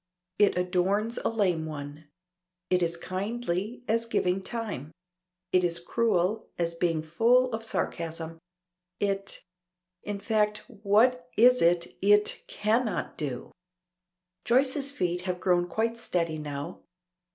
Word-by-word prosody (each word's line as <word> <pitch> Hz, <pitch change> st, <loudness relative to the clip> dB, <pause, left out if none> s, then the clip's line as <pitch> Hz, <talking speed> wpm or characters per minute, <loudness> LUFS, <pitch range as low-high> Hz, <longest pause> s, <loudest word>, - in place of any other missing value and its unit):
It 205 Hz, -3 st, +4 dB
adorns 190 Hz, +5 st, +1 dB
a -, -, 0 dB
lame 185 Hz, -8 st, +1 dB
one. 145 Hz, 0 st, -7 dB, 0.7 s
It 180 Hz, 0 st, +3 dB
is 170 Hz, 0 st, 0 dB
kindly, 200 Hz, +4 st, -3 dB
as 230 Hz, +1 st, +1 dB
giving 185 Hz, -4 st, +1 dB
time. 200 Hz, -, -5 dB, 0.6 s
It 180 Hz, 0 st, +5 dB
is 170 Hz, -1 st, 0 dB
cruel, 205 Hz, +1 st, 0 dB
as 170 Hz, -1 st, 0 dB
being 165 Hz, -2 st, 0 dB
full 235 Hz, +10 st, +3 dB
of 225 Hz, 0 st, -3 dB
sarcasm. 165 Hz, -6 st, -3 dB, 0.6 s
It 195 Hz, -1 st, -2 dB, 0.6 s
In 205 Hz, -1 st, -4 dB
fact 210 Hz, 0 st, +1 dB, 0.2 s
what 245 Hz, +5 st, +3 dB
is 250 Hz, +2 st, +6 dB
it 170 Hz, 0 st, +2 dB
it 205 Hz, +1 st, +3 dB
cannot 220 Hz, +2 st, 0 dB
do? 135 Hz, -5 st, -4 dB, 0.9 s
Joyce's 270 Hz, +3 st, +2 dB
feet 180 Hz, -9 st, -1 dB
have 180 Hz, 0 st, -1 dB
grown 175 Hz, -1 st, +2 dB
quite 230 Hz, +5 st, -1 dB
steady 170 Hz, -8 st, -1 dB
now. 145 Hz, +3 st, -5 dB
195 Hz, 120 wpm, -28 LUFS, 170-225 Hz, 0.9 s, is